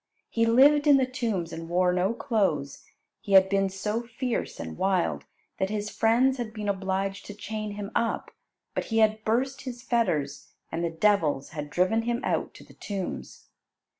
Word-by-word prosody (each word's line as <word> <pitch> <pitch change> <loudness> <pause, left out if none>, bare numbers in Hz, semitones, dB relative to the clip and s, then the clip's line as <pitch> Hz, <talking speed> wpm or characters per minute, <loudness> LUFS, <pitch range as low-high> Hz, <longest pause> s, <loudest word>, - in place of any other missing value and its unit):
He 230 0 +2
lived 285 +6 +5
in 285 -2 +8
the 265 - +3
tombs 225 - -2
and 165 0 -7
wore 180 +1 +2
no 180 +3 +1
clothes. 190 - -1 0.4
He 200 -3 -4
had 190 0 +7
been 195 0 +2
so 210 +4 -2
fierce 240 +1 -3
and 80 -1 -6
wild 190 -2 0 0.3
that 190 0 0
his 210 0 -3
friends 250 +4 +3
had 225 -2 -4
been 210 -1 -4
obliged 195 0 -2
to 205 - -8
chain 215 0 -5
him 205 0 -6
up, 230 - -1 0.4
but - - -2
he 225 - -2
had 215 0 +3
burst 260 +5 0
his 245 -2 -7
fetters, 155 - -1 0.2
and 165 +1 -2
the 170 - +1
devils 165 -5 +1
had 150 -1 -6
driven 185 +8 +2
him 240 +1 -1
out - - -1
to - - -12
the - - -17
tombs. 195 -3 -6
210 Hz, 180 wpm, -27 LUFS, 185-230 Hz, 0.4 s, in